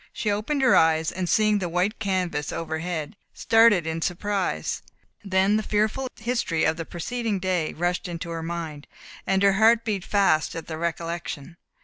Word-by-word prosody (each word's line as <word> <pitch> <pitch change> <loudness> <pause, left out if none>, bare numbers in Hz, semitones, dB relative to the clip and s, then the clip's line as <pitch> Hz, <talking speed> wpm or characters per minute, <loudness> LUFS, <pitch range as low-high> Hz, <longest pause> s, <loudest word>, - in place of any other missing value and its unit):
She 210 - -1
opened 250 +8 -1
her 255 - +5
eyes, 160 0 +3
and 180 -1 -3
seeing 215 -1 +3
the 180 -3 -3
white 180 +6 0
canvas 185 -7 -1
overhead, 160 +2 -4 0.2
started 225 -6 +4
in 160 0 -3
surprise; 190 +2 -2 0.4
then 195 +1 +2
the - - 0
fearful 215 +5 0
history 230 -8 -1
of 160 - +2
the 165 0 -5
preceding 225 +5 -3
day 180 -4 -1
rushed 175 +3 -1
into 170 -1 -5
her 165 0 -4
mind, 160 -3 -5 0.4
and 195 0 +2
her 200 -1 +5
heart 225 +3 +4
beat 205 -4 -1
fast 195 -8 +2
at 165 - -5
the 160 -1 -6
recollection. 170 -2 -4
180 Hz, 165 wpm, -25 LUFS, 165-210 Hz, 0.4 s, her